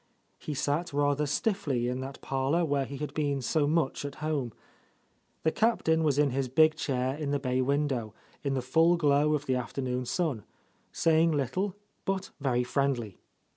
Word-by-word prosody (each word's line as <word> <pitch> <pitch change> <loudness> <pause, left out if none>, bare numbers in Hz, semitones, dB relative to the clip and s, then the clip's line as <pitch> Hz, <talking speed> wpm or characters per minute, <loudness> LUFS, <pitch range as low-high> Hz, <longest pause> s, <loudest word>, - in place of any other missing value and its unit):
He 150 - -5
sat 145 +4 -1
rather 145 +1 +1
stiffly 145 - 0
in 125 +1 -2
that 135 +1 -7
parlour 135 +6 0
where 140 -3 0
he 140 - -7
had 150 +1 -5
been 145 -2 0
so 145 +3 +1
much 155 -3 0
at 140 -1 -5
home. 150 -6 -2 0.9
The 160 - +3
Captain 160 -8 +2
was 145 -3 +2
in 145 -2 +3
his 135 +1 -1
big 155 +4 +5
chair 130 -4 -1
in 150 -1 -3
the 145 - +1
bay 130 -2 0
window, 130 -5 0 0.3
in 140 -1 0
the 130 - -1
full 165 +7 +4
glow 150 -1 +3
of 145 -1 -3
the 130 - +1
afternoon 125 0 -2
sun, 150 - -1 0.5
saying 165 0 +3
little, 180 - -1 0.3
but 195 0 -2
very 125 -3 +1
friendly. 125 -6 -1
145 Hz, 175 wpm, -29 LUFS, 130-155 Hz, 0.9 s, big